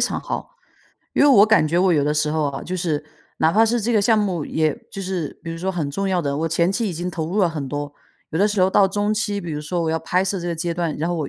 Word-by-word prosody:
常 - - 0
好。 - - -6 0.6
因 - - +1
为 290 - +6
我 210 -7 +7
感 215 -7 +4
觉 165 +3 -1
我 185 -1 +4
有 145 -3 +2
的 150 +1 0
时 150 0 +1
候 155 0 0
啊， 135 0 -6
就 185 +1 -4
是 155 -4 -1 0.3
哪 160 - +3
怕 220 +3 +5
是 235 +1 +1
这 235 +3 0
个 215 - +4
项 225 +1 +4
目， 185 -7 -1
也 155 0 0
就 195 -2 -6
是 180 -6 -4
比 165 - -6
如 165 - -6
说 190 +3 -1
很 155 -6 -2
重 195 +7 -2
要 180 -2 +1
的， 140 -1 -1
我 165 +1 0
前 170 +2 +2
期 225 0 0
已 - - -3
经 175 +2 -4
投 160 -2 -3
入 200 +4 -2
了 180 - +4
很 150 -5 -5
多。 145 +1 -4 0.4
有 160 - -2
的 205 - +4
时 205 -2 0
候 185 +1 +4
到 195 - +5
中 205 +2 -1
期， 205 -1 -1
比 175 - -6
如 150 - -3
说 170 +3 -2
我 160 - 0
要 160 - 0
拍 180 +4 0
摄 195 0 -1
这 175 - -5
个 170 - -1
阶 170 +1 -2
段， 170 -3 -2
然 165 - -1
后 175 - -1
我 150 -4 -3
175 Hz, 335 characters per minute, -21 LUFS, 155-195 Hz, 0.6 s, 我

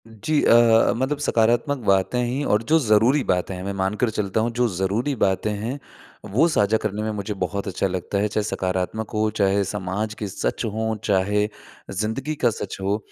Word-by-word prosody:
जी, 115 +8 -1
अ - - +5
अ, 115 -1 +5
मतलब 135 +4 0
सकारात्मक 120 +1 +2
बातें 100 +5 +2
ही 125 +4 -1
और 105 -4 +1
जो 160 - +7
ज़रूरी 120 +3 +3
बातें 90 -1 0
हैं 90 - -7
मैं 100 +1 -3
मान 95 +2 0
कर 120 - +3
चलता 105 -1 -1
हूँ 115 +2 0
जो 125 - +4
ज़रूरी 100 +10 0
बातें 105 -1 +1
हैं, 110 +7 -4 0.5
वो 110 - +3
साझा 110 -9 +2
करने 105 -1 -3
में 110 - -1
मुझे 105 0 -4
बहुत 100 +2 -3
अच्छा 95 +1 -1
लगता 95 +1 -3
है 105 +1 +2
चाहे 105 0 -1
सकारात्मक 95 +2 -2
हो, 110 0 +1
चाहे 100 -1 +2
समाज 105 +2 -3
के 105 -1 -5
सच 95 - -3
हों, 110 +1 -2
चाहे 105 +1 +1 0.4
ज़िंदगी 110 +10 -2
का 120 - +6
सच 105 -3 -5
हो 100 +2 0
105 Hz, 195 wpm, -23 LUFS, 100-115 Hz, 0.5 s, जो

